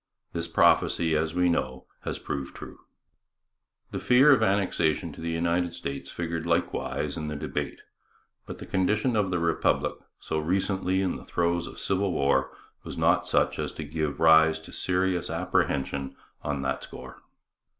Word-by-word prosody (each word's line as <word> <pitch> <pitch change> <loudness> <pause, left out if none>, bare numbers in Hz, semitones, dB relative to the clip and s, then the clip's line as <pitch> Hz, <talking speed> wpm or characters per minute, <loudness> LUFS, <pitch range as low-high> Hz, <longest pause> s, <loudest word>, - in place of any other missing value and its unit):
This 85 0 -2
prophecy, 80 -2 +3
as 80 +1 0
we 90 0 +3
know, 65 -6 -1 0.2
has - - -2
proved 70 -2 -5
true. - - -10 1.1
The - - -3
fear 130 +4 +6
of 135 - +5
annexation 95 -6 +1
to - - -11
the 85 - -3
United 85 +1 0
States 70 -4 -5
figured 85 -1 -4
likewise 85 -3 -1
in 75 -1 -4
the 75 - -4
debate, 75 - -4 0.7
but - - -7
the - - -9
condition 105 +6 +1
of 105 -3 +1
the 90 - 0
Republic, 85 -1 +1 0.3
so 80 - -2
recently 95 +3 0
in 95 - -1
the - - -11
throes 85 0 0
of - - -9
civil 95 0 0
war, 70 -3 +2 0.3
was - - -7
not - - +2
such - - +1
as - - -2
to 80 - -6
give 75 -1 -3
rise 80 0 +6
to 80 - -12
serious 90 -1 0
apprehension 70 0 -1 0.3
on 70 -2 -2
that 65 0 -1
score. 65 0 -10
85 Hz, 160 wpm, -27 LUFS, 75-90 Hz, 1.1 s, fear